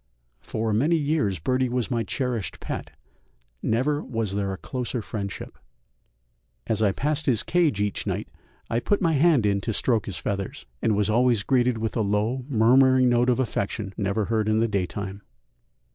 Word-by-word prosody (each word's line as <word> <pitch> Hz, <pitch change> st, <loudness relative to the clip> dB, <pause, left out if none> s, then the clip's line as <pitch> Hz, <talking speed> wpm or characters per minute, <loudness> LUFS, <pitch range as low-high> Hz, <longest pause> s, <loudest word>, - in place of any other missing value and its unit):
For 110 Hz, -, -2 dB
many 145 Hz, +11 st, +3 dB
years 145 Hz, -, 0 dB
Birdie 130 Hz, +10 st, 0 dB
was 125 Hz, +1 st, -1 dB
my 120 Hz, -2 st, +1 dB
cherished 115 Hz, -, -3 dB
pet, -, -, -5 dB, 0.7 s
never 145 Hz, +7 st, 0 dB
was 115 Hz, -5 st, -3 dB
there 100 Hz, -1 st, -1 dB
a 95 Hz, -, -4 dB
closer 125 Hz, +1 st, -4 dB
friendship. 100 Hz, -2 st, -6 dB, 1.1 s
As 110 Hz, -1 st, -1 dB
I 105 Hz, -2 st, +4 dB
passed 150 Hz, +7 st, -1 dB
his 120 Hz, -5 st, +2 dB
cage 170 Hz, -, +2 dB
each 105 Hz, -1 st, -1 dB
night -, -, -2 dB, 0.4 s
I 115 Hz, -, 0 dB
put 205 Hz, +11 st, +1 dB
my 165 Hz, -4 st, +2 dB
hand 150 Hz, -5 st, +4 dB
in 100 Hz, -1 st, +1 dB
to 115 Hz, -, -2 dB
stroke 115 Hz, +1 st, +1 dB
his 100 Hz, -, -3 dB
feathers, 100 Hz, -1 st, -4 dB, 0.2 s
and 110 Hz, -, +2 dB
was 105 Hz, +1 st, +1 dB
always 120 Hz, -2 st, +3 dB
greeted 125 Hz, -3 st, +2 dB
with 110 Hz, 0 st, -3 dB
a 115 Hz, -, +1 dB
low, 110 Hz, +5 st, 0 dB
murmuring 130 Hz, +2 st, +5 dB
note 120 Hz, +1 st, +3 dB
of 125 Hz, -, +2 dB
affection 105 Hz, -4 st, -2 dB
never 100 Hz, +1 st, -1 dB
heard 110 Hz, -1 st, 0 dB
in 110 Hz, 0 st, +2 dB
the 115 Hz, -, +2 dB
daytime. 100 Hz, 0 st, -3 dB
115 Hz, 175 wpm, -25 LUFS, 105-130 Hz, 1.1 s, murmuring